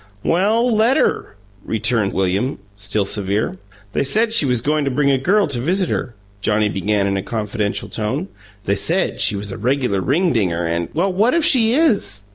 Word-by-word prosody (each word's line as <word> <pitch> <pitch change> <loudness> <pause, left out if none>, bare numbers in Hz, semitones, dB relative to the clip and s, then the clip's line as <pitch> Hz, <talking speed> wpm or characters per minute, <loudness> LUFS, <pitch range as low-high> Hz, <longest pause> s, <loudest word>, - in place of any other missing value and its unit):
"Well, 220 +7 +2
let 230 +5 +3
her!" - - 0 0.3
returned 110 -2 0
William, 95 +7 -1 0.2
still 100 0 -1
severe. 100 0 -1 0.4
"They - - +1
said 220 - +2
she 160 -11 +3
was 125 -2 +2
goin' 150 +3 0
to 140 - 0
bring 140 +2 +1
a 135 - +2
girl 200 +9 +2
to 140 -5 -1
visit 180 +7 0
her," 120 - -3 0.3
Johnnie 105 +1 +1
began 100 +1 0
in 100 0 0
a - - -1
confidential 105 -1 -3
tone. 130 - -3 0.4
"They 100 - 0
said 100 - +1
she - - +3
was 100 0 -5
a - - -7
reg'lar 125 -6 0
ringdinger 110 - 0
and 85 +1 -2
" - - -25
"Well, 185 +4 +1
what 220 - +2
if 335 -2 +2
she 235 -2 +3
is?" 205 - +1
125 Hz, 190 wpm, -19 LUFS, -, 0.4 s, let